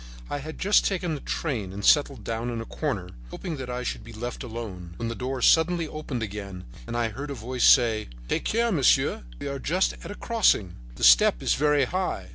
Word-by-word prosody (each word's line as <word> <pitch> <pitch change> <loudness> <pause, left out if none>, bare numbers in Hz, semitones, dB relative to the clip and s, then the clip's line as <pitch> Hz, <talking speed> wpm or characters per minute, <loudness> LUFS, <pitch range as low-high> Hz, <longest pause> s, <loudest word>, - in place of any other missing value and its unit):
I 145 - -2
had 155 +3 -8
just 205 +2 +4
taken 180 -4 -1
the 145 - -5
train 115 - -3
and 100 +1 -5
settled 140 -6 +4
down 115 +3 -3
in 120 -1 -3
a 115 - -5
corner, 110 - -3 0.2
hoping 165 - -5
that 130 -2 -6
I 125 0 -3
should - - -4
be 115 - -11
left 120 +3 -5
alone, 110 -8 -7
when 115 -1 -3
the - - -3
door 125 +1 -4
suddenly 165 0 +4
opened 150 -6 -5
again 100 -3 -6 0.2
and 120 - -3
I 115 -1 +1
heard 140 +7 -7
a 140 - -4
voice 125 +2 -1
say: 115 -4 +4 0.2
"Take - - -1
care, 235 +1 +1
monsieur, 145 -9 +3 0.2
we - - -6
are 140 0 -4
just 180 +8 +1
at - - -8
a 205 - -6
crossing; 205 - +2 0.2
the - - -7
step - - +6
is - - +3
very 150 -1 +3
high." 185 - -3
125 Hz, 220 wpm, -26 LUFS, 110-155 Hz, 0.2 s, step